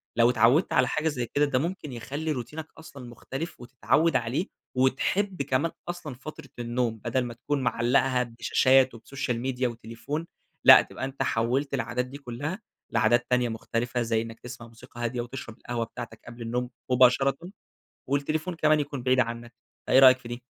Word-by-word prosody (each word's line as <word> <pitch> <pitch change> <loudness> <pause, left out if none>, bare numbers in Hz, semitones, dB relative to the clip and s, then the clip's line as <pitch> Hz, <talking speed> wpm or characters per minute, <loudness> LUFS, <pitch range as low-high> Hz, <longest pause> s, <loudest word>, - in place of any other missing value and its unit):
لو 115 +1 +5
اتعوَّدت 125 +7 +3
على 125 -1 +4
حاجة 155 +4 -1
زي 130 -6 -1
كده، 145 +6 +1
ده 135 -3 +1
ممكن 165 -1 -4
يخلّي 145 +7 -4
روتينك 150 +4 -5
أصلًا 140 -5 -11
مختلف 135 +7 -6
وتتعوَّد 140 +6 +1
عليه 130 +8 0 0.3
وتحب 160 +9 +1
كمان 140 +4 0 0.2
أصلًا 165 -6 -5
فترة 155 +5 -10
النوم، 120 -1 -1
بدل 120 +2 +1
ما 120 -1 -5
تكون 140 +4 -2
معلَّقها 125 +1 +2
بشاشات 130 +2 +3
وبسوشيال 120 0 -4
ميديا 130 0 -1
وتليفون. 120 +7 -5 0.4
لأ، - - +10
تبقى - - -6
أنت 135 0 -3
حوَّلت 130 +4 0
العادات 125 -2 -1
دي 130 +2 -9
كلها 145 - -5 0.3
لعادات 120 +2 +3
تانية 125 -1 +2
مختلفة، 120 +2 -2
زي 115 -1 +1
إنك 115 0 -8
تسمع 120 -1 -9
موسيقى 120 +1 -11
هادية 120 +1 -1
وتشرب 120 -2 -8
القهوة 120 -1 -3
بتاعتك 110 0 -9
قبل 120 0 -10
النوم 120 +2 -2 0.2
مباشرةً، 130 +2 +4 0.7
والتليفون 155 +6 -1
كمان 155 -2 +3
يكون 145 -3 -4
بعيد 130 0 +3
عنك. 120 0 -3 0.3
فإيه - - +5
رأيك 130 -1 +8
في 125 -2 -11
دي؟ 120 +1 -6
125 Hz, 165 wpm, -27 LUFS, 120-140 Hz, 0.7 s, لأ